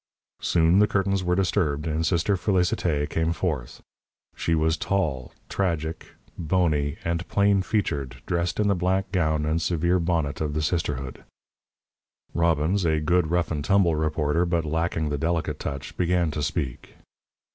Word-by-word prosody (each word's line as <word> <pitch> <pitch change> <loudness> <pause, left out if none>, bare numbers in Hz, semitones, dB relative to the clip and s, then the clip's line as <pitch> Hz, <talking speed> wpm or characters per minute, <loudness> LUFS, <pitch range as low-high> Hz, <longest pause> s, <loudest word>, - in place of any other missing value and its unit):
Soon 85 +2 +3
the 105 - +5
curtains 95 -1 0
were 90 0 +1
disturbed, 85 -6 0
and 80 0 -1
Sister 85 +4 +1
Félicité 90 -6 +1
came 80 0 0
forth. 75 -7 -3 0.5
She 80 - 0
was 80 0 +2
tall, 80 -11 -1 0.2
tragic, 80 -4 -3 0.2
bony, 80 -3 0
and 85 +1 -1
plain 100 -1 +3
featured, 75 - -1
dressed 85 +2 -1
in 105 - +2
the 100 - +4
black 95 +1 0
gown 80 -5 +1
and 80 +2 0
severe 85 +2 +1
bonnet 80 -5 -1
of 75 -1 -2
the 75 - 0
sisterhood. 75 -5 -2 1.1
Robbins, 85 +3 +1
a 80 -2 +2
good 80 +1 +1
rough 85 0 0
and 75 -3 -2
tumble 90 -1 +3
reporter, 75 +1 +1
but 85 -2 0
lacking 80 0 -1
the 75 -1 -2
delicate 80 +1 -1
touch, 70 -1 -5
began 90 -2 +1
to 75 - -3
speak. 70 -4 -3
85 Hz, 150 wpm, -25 LUFS, 75-90 Hz, 1.1 s, the